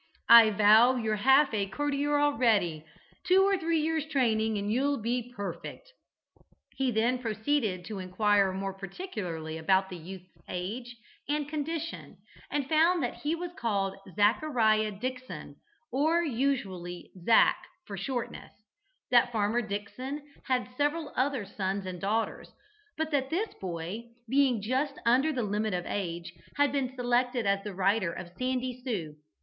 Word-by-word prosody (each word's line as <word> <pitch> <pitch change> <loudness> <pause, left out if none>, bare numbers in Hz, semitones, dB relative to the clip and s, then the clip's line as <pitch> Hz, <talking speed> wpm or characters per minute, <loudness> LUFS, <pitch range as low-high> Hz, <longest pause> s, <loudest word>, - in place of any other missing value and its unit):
"I 230 -1 +10
vow 215 +4 +6
you're 220 -3 -1
half 270 +4 +5
a 200 -2 0
courtier 290 +5 0
already. 220 - +2 0.4
Two 370 +2 +5
or 395 0 +3
three 335 -3 0
years' 315 0 -1
training 225 -7 +1
and 205 +1 -2
you'll 280 +3 +1
be 240 +2 -2
perfect." - - -7 0.8
He 270 -1 0
then 240 +2 +1
proceeded 220 -4 -1
to 210 -1 -6
inquire 195 +1 +2
more 195 +1 -3
particularly 185 - -6
about 190 +3 +2
the 180 - -7
youth's 180 +2 -11 0.2
age 235 +7 -5 0.3
and 295 -1 0
condition, 315 +2 -4 0.3
and 290 -2 -1
found 330 +3 +3
that - - -3
he 305 +3 -1
was 345 +1 -5
called 200 - -1 0.2
Zachariah 215 0 +3
Dickson, 255 +5 -6 0.3
or 315 +6 +2
usually 225 - -2
"Zac" 225 +4 +5 0.3
for 200 - -7
shortness, 240 +5 -5 0.6
that 245 0 +5
Farmer 220 +1 +1
Dickson 255 +7 -5 0.2
had 255 -1 0
several 295 +1 -1
other 260 -4 0
sons 195 0 -3
and 180 -2 -6
daughters, 220 +3 -2 0.5
but 315 0 -2
that 270 -2 0
this 390 +7 -1
boy, 185 +6 -6 0.2
being 260 -4 +2
just 265 +5 0
under 260 +6 +4
the 255 -5 -1
limit 210 -1 -1
of 175 - -3
age, 170 -4 -4 0.2
had 285 -1 +3
been 265 -2 -2
selected 245 -1 +1
as 200 0 +1
the 205 -3 -6
rider 195 -1 +2
of 175 0 -8
"Sandy 255 0 -2
Sue." 170 - -4
235 Hz, 145 wpm, -29 LUFS, 200-280 Hz, 0.8 s, I